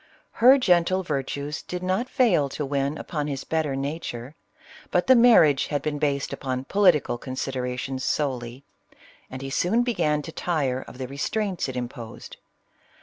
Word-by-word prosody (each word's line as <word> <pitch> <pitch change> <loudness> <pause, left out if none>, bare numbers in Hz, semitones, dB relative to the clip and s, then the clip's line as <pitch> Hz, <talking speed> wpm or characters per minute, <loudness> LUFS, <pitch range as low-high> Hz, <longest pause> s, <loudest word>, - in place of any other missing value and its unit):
Her 260 +4 +8
gentle 185 -5 +2
virtues 145 -1 -3
did 180 0 -6
not 190 +7 -1
fail 180 - +3
to 145 +2 -4
win 140 +1 -1
upon 150 -4 -4
his 140 -2 -4
better 155 -4 -1
nature; 135 -2 -5 0.6
but 180 - +1
the 260 - +7
marriage 220 - +6
had 145 -1 -2
been 150 -1 -2
based 140 -2 -1
upon 130 -1 -3
political 180 -11 +3
considerations 130 0 -4
solely, 130 -3 -2 0.7
and 130 +1 -7
he 135 - -5
soon 220 - +2
began 150 -11 0
to 160 - -7
tire 140 -7 -1
of - - -12
the 130 -1 -5
restraints 185 - -2
it 130 - -6
imposed. 120 -2 -7
145 Hz, 150 wpm, -25 LUFS, 130-180 Hz, 0.7 s, Her